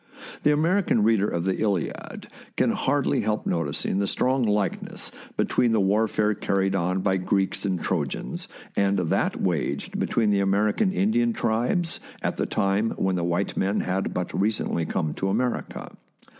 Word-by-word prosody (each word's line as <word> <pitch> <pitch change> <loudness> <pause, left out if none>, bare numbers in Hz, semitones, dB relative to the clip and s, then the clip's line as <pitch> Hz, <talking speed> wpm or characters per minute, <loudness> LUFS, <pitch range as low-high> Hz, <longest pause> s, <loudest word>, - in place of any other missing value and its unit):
The 150 - +4
American 160 - +2
reader 105 -2 +3
of 85 -3 -2
the 95 - 0
" - - -3
Iliad 100 -6 -2 0.2
" - - -23
can - - +3
hardly 140 +1 +1
help 110 0 -1
noticing 85 +3 -1
the 100 - +1
strong 130 +5 +1
likeness 105 -3 -1 0.3
between 120 -2 +2
the 110 - +3
warfare 105 +2 +2
carried 95 -1 0
on 90 0 0
by 95 0 +2
Greeks 95 +2 0
and 95 -3 0
Trojans - - -2 0.3
and 100 0 +2
that 90 -3 0
waged 90 -5 -1
between 110 -3 +1
the 100 - +3
American 105 - +2
Indian 225 +4 +2
tribes 145 - 0 0.2
at - - -1
the - - -1
time 100 +3 0
when 95 -1 +1
the 85 - -1
white 85 +3 -1
men 100 +2 +1
had 95 +1 -1
but 90 -1 -3
recently 100 -5 0
come 75 -2 -1
to 95 - -2
America. 120 +5 -2
100 Hz, 165 wpm, -25 LUFS, 95-115 Hz, 0.3 s, The